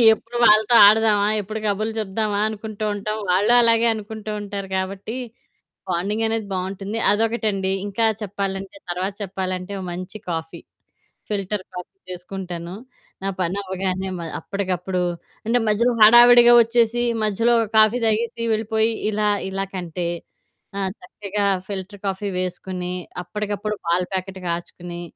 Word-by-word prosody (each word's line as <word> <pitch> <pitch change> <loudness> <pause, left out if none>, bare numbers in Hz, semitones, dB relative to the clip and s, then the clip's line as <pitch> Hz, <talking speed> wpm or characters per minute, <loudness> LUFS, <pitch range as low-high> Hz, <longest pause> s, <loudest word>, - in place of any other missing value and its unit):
ఎప్పుడు 235 +2 -10
వాళ్ళతో 215 +2 +5
ఆడదామా? 210 -1 +4
ఎప్పుడు 215 +3 -5
కబుర్లు 215 +2 -1
చెప్దామా? 210 0 -1
అనుకుంటూ 215 0 -6
ఉంటాం. 215 +1 -3
వాళ్ళు 200 +6 +3
అలాగే 230 0 +4
అనుకుంటూ 215 0 -7
ఉంటారు 200 -1 -5
గాబట్టి, 190 +4 -3 0.7
బాండింగనేది 215 +5 -1
బావుంటుంది. 195 +4 -3
అదొకటండి 210 -3 0 0.2
ఇంకా 215 +3 0 0.2
చెప్పాలంటే 195 +3 -4
తర్వాత 185 +3 -2
చెప్పాలంటే 185 0 -4
ఓ - - -6
మంచి 185 +4 -7
కాఫీ. 160 -1 -5 0.7
ఫిల్టర్ 200 -1 -2
కాఫీ 180 - -8
చేసుకుంటాను. 180 -1 -6 0.5
నా - - 0
పనవ్వగానే 190 +1 -2
మ - - -6 0.2
అప్పటికప్పుడు 185 -2 -2 0.5
అంటే 235 +2 +3
మధ్యలో 235 +4 +2
హడావిడిగా 240 +2 +9
ఒచ్చేసి 235 +1 +1 0.2
మధ్యలో 230 +3 +2
ఒక 225 - -1
కాఫీ 215 +2 +5
తాగేసి 230 +2 -1
వెళ్ళిపోయి, 220 +1 +1 0.2
ఇలా 210 0 0 0.2
ఇలా 195 0 -2
కంటే 175 -1 -3 0.7
ఆ - - -1 0.2
చక్కగా 200 +2 -3 0.2
ఫిల్టర్ 200 0 -6
కాఫీ 195 +1 -2
వేసుకొని, 180 0 -4 0.3
అప్పటికప్పుడు 210 +3 -3
పాల 170 +2 +2
ప్యాకెట్ 190 0 -4
కాచుకుని, 175 0 -5
200 Hz, 120 wpm, -22 LUFS, 185-220 Hz, 0.7 s, హడావిడిగా